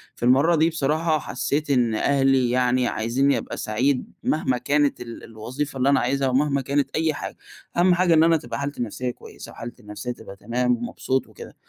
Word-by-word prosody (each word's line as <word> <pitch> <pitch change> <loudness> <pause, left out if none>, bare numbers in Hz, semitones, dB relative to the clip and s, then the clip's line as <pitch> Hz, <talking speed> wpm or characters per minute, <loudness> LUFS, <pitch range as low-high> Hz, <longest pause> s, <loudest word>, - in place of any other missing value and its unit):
في - - -10
المرة 140 +7 +5
دي 160 +2 +3
بصراحة 155 +1 0
حسّيت 145 +1 -2
إن 120 -5 +2
أهلي 135 0 +2
يعني 125 0 +2
عايزنني 130 +6 +1
أبقى - - -6
سعيد 125 +5 0
مهما 130 -5 +1
كانت 145 +2 +1
ال 115 -1 -8
الوظيفة 130 +6 -5
اللي 135 +2 +2
أنا 140 - +4
عايزها، 135 +2 0
ومهما 140 +2 +1
كانت 140 +1 0
أي 160 -1 +1
حاجة. - - -6 0.4
أهم 180 +1 +5
حاجة 175 -1 +3
إن 160 0 +6
أنا 165 0 +4
تبقى 150 - -6
حالتي 140 0 -4
النفسية 125 +2 -3
كويسة، - - -12
وحالتي 120 +1 -9
النفسية 105 +3 -6
تبقى 110 -4 -10
تمام، 120 +4 0
ومبسوط 130 +2 -2
وكده. - - -12
135 Hz, 185 wpm, -23 LUFS, 120-145 Hz, 0.4 s, إن